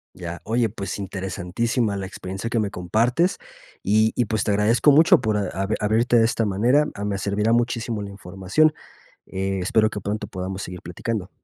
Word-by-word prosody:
Ya. 85 -1 -7
Oye, 115 0 +1
pues 100 -2 -5
interesantísima 100 +4 -2
la 95 -1 -4
experiencia 95 +3 -6
que 115 - 0
me 105 -2 -1
compartes, 115 - +1 0.5
y 110 +1 +3
y, 125 - +1
pues, 110 +1 -1
te 105 - 0
agradezco 110 +7 +4
mucho 155 -2 +6
por 110 -3 0
a 100 -3 -1 0.3
abrirte 115 +3 +2
de 115 - +5
esta 115 0 0
manera, 120 +9 +2 0.2
me 100 -1 -1
servirá 105 +3 0
muchísimo 115 -2 0
la 100 - -6
información. 100 - +1 0.5
Eh, 95 0 -3
espero 110 +4 +2
que 105 - -5
pronto 105 +2 -4
podamos 95 -1 -5
seguir 90 -2 -7
platicando. 95 +3 -4
105 Hz, 175 wpm, -23 LUFS, 95-115 Hz, 0.5 s, mucho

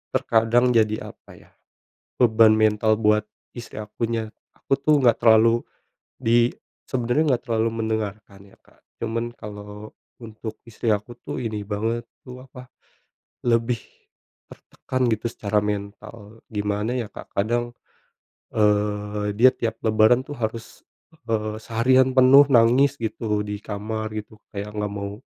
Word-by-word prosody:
terkadang 115 +2 +3
jadi 110 -2 +1
apa - - -18
ya, - - -19 0.7
beban 110 -2 +5
mental 110 0 +3
buat 105 -1 +2 0.2
istri 115 -3 -8
akunya, 110 +1 -3 0.2
aku 135 - -1
tuh 150 +2 +3
enggak 120 -2 +4
terlalu 115 0 +5 0.6
di 120 +1 +3 0.4
sebenarnya 125 +4 0
enggak 125 -4 +1
terlalu 115 -2 0 0.2
mendengarkan 110 -2 -4
ya, - - -21
Kak. - - -26 0.2
Cuman 115 +1 -3
kalau 105 0 -10 0.2
untuk 110 -1 -8
istri 115 0 -5
aku 105 +2 0
tuh - - -6
ini 110 -3 -3
banget 115 +3 -2 0.2
tuh 125 -1 -10
apa, 130 -1 -13 0.7
lebih 115 -1 +1 0.7
tertekan 130 0 -6
gitu 110 +1 -1
secara 105 -2 -1
mental. 105 +1 -6
Gimana 105 +2 -2
ya, 115 -5 -4
Kak, - - -12
kadang, 120 +4 -1 0.8
eee, 105 -1 0
dia 125 +4 +6
tiap 115 -3 -3
lebaran 110 +3 +4
tuh 145 +1 -9
harus, 110 0 -5 0.5
eee, 110 -1 -2
seharian 130 +4 +2
penuh 135 +2 +7
nangis 130 +2 +4
gitu, 110 -3 -2
di 105 0 -5
kamar 110 +1 -5
gitu, 110 0 -8 0.2
kayak 100 +1 -5
enggak 105 -1 -3
mau 100 0 -4
110 Hz, 135 wpm, -23 LUFS, 105-120 Hz, 0.8 s, penuh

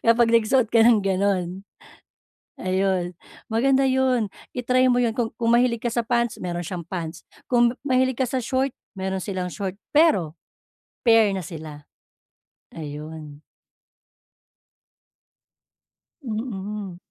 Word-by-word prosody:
Kapag 230 0 +5
nagsuot 230 +1 +3
ka 230 - +5
ng 230 -2 +6
gano'n, 190 -2 0 1.0
ayun. 185 -1 0 0.4
Maganda 270 +4 +3
'yon, 260 -4 +2 0.3
i-try 255 +1 +3
mo - - +2
'yon, 235 -2 +1
kung 230 -2 -1
kung 230 0 -1
mahilig 240 -1 +3
ka - - +2
sa 240 - +1
pants, 235 -1 0
meron 175 -1 -3
siyang 175 0 -5
pants, 170 -2 -6 0.2
kung 240 -1 +4
ma-mahilig 260 -2 +2
ka 260 - +3
sa 260 +2 -1
short 260 +2 0 0.2
meron 190 0 -2
silang 185 -1 -3
short. 195 -2 -4 0.2
Pero, 195 - +4 0.7
pair 225 -3 +5
na 185 - -4
sila. 155 -2 -9 0.9
Ayun. 150 -1 -8 2.8
Mm. 210 -5 -5
215 Hz, 120 wpm, -24 LUFS, 180-245 Hz, 2.8 s, ng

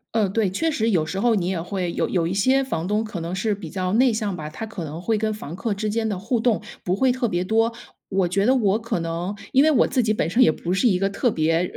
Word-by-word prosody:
嗯， 210 -4 +2
对， 220 -1 +1
确 325 - 0
实 230 -7 0
有 170 -6 +2
时 190 - -3
候 235 +3 +3
你 185 -5 0
也 185 -2 -1
会 180 +1 -3
有 - - 0
有 170 -3 0
一 175 - -2
些 260 +7 +3
房 180 -10 -3
东 210 +2 +1
可 215 -5 -6
能 170 +2 -4
是 205 +3 0
比 200 - -9
较 185 0 -2
内 250 +1 +4
向 210 -3 -2
吧， 155 -3 -6
他 155 +8 -7
可 215 -5 -6
能 155 +3 -7
会 220 +4 0
跟 215 0 -1
房 170 -6 -7
客 210 +3 -2
之 210 +2 -3
间 220 +1 -1
的 205 -4 -2
互 225 +5 -1
动 225 -1 +1 0.2
不 180 - 0
会 260 +5 +3
特 250 -1 0
别 175 -3 -1
多。 225 +3 +1 0.4
我 190 -2 +1
觉 195 +3 +1
得 255 - +5
我 215 -5 +2
可 225 -6 -2
能 170 +4 -3 0.2
因 270 - +6
为 315 - +5
我 285 - +4
自 250 - +1
己 215 -1 +1
本 210 - -1
身 245 +8 +4
也 - - +5
不 170 +2 -5
是 190 +6 +3
一 185 -4 +2
个 195 - +1
特 215 +4 0
别， 165 +2 +1
205 Hz, 310 characters per minute, -23 LUFS, 180-225 Hz, 0.4 s, 因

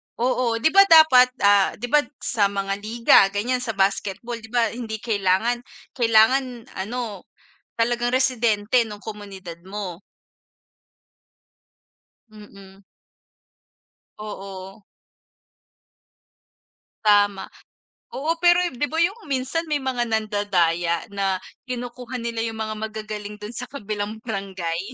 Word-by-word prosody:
Oo, 245 -1 0
'di 315 +7 +2
ba, 395 0 +7
dapat, 315 -7 +7
ah, 200 -1 +4
'di 245 +3 -5
ba, 300 - +6 0.2
sa 205 -3 +2
mga 195 0 -2
liga 230 +3 +4
ganyan 225 +6 -1
sa 230 -3 -4
basketball, 200 +4 -1
'di 220 - -12
ba, 235 -2 +1
hindi 230 -2 -5
kailangan 215 +2 +1 0.3
kailangan 240 +1 +3 0.2
ano 215 -1 -5 0.5
talagang 240 +1 +1
residente 245 -3 +2
nung 210 -2 -7
komunidad 195 -6 -9
mo. 190 -2 -6 2.3
Mm. 200 -2 -15 1.3
Oo. 195 -2 -8 2.3
Tama. 205 -2 +3 0.7
Oo, 325 +4 -2
pero, 350 +1 +5
di 255 +3 -1
ba, 320 - -5
yung 400 +3 -4
minsan 275 +5 -2
may 300 - +1
mga 245 -2 -1
nandadaya 185 -6 0
na 195 -1 0 0.3
kinukuha 250 0 -5
nila 235 -1 -4
yung 225 -1 -3
mga 215 0 -3
magagaling 215 -1 -7
dun 210 +2 -8
sa 245 +2 -6
kabilang 215 -5 -5
barangay. 190 -6 -3
220 Hz, 110 wpm, -23 LUFS, 200-245 Hz, 2.3 s, ba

